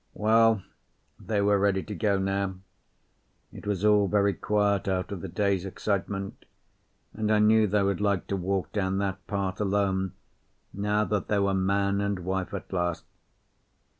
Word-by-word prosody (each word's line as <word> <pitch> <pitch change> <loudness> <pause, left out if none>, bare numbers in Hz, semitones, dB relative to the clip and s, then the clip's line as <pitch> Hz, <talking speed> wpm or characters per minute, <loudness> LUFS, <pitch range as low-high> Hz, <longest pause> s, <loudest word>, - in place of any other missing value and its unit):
Well, 110 -1 +3 0.6
they 105 -2 -1
were 100 0 +3
ready 95 -1 +1
to 105 - -7
go 100 +1 +1
now. 95 0 -1 1.0
It - - -10
was 100 -1 -1
all 105 -1 +4
very 100 0 +2
quiet 105 -2 0
after 95 +1 -1
the 95 +1 -6
day's 100 0 0
excitement, 100 0 -3 0.7
and 110 0 -1
I 110 - +4
knew 110 +1 +5
they 105 0 +2
would 100 -1 0
like 100 -3 +1
to 100 - 0
walk 95 0 -2
down 95 -2 -1
that 95 -1 -3
path 100 -1 -2
alone 95 -2 0 0.6
now 105 +1 0
that 105 -2 -2
they 105 - +1
were 100 -1 +2
man 100 +1 +1
and 100 -1 -1
wife 95 +1 -3
at 100 -1 -7
last. 90 -2 -1
100 Hz, 160 wpm, -27 LUFS, 95-105 Hz, 1.0 s, knew